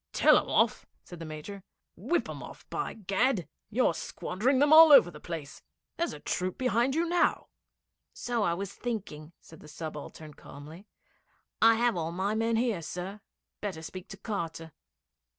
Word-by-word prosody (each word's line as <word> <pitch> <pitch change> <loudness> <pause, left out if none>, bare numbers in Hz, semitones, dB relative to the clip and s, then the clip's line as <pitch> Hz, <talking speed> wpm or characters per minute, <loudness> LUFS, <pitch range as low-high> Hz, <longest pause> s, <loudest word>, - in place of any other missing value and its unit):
'Tell - - +6
'em - - -7
off!' - - +1 0.2
said 175 - -11
the 165 - -7
Major. 155 +6 -8 0.3
'Whip 345 - -1
'em - - -7
off, - - -11
by 395 - -3
Gad! 200 - 0 0.2
You're 235 -4 +2
squandering 225 - -1
them 290 +3 +4
all 320 0 +10
over 175 -11 +8
the 150 - -12
place. 160 -5 -7 0.4
There's 340 - -1
a - - -9
troop 185 +4 -3
behind 255 +2 +1
you 335 +1 +1
now!' 350 +1 +1 0.6
'So 240 -2 -3
I 170 -4 +1
was 200 +2 -5
thinking,' 185 -10 -6
said 160 - -16
the - - -14
subaltern 155 0 -8
calmly. 155 +9 -12 0.7
'I 225 0 +7
have 235 -1 +2
all 165 -1 -2
my 190 +4 -1
men 225 +1 0
here, 225 -6 0
sir. 180 +5 -6 0.4
Better 185 -6 -5
speak 185 +3 -8
to 195 - -10
Carter.' 165 -6 -5
195 Hz, 170 wpm, -29 LUFS, 165-235 Hz, 0.7 s, all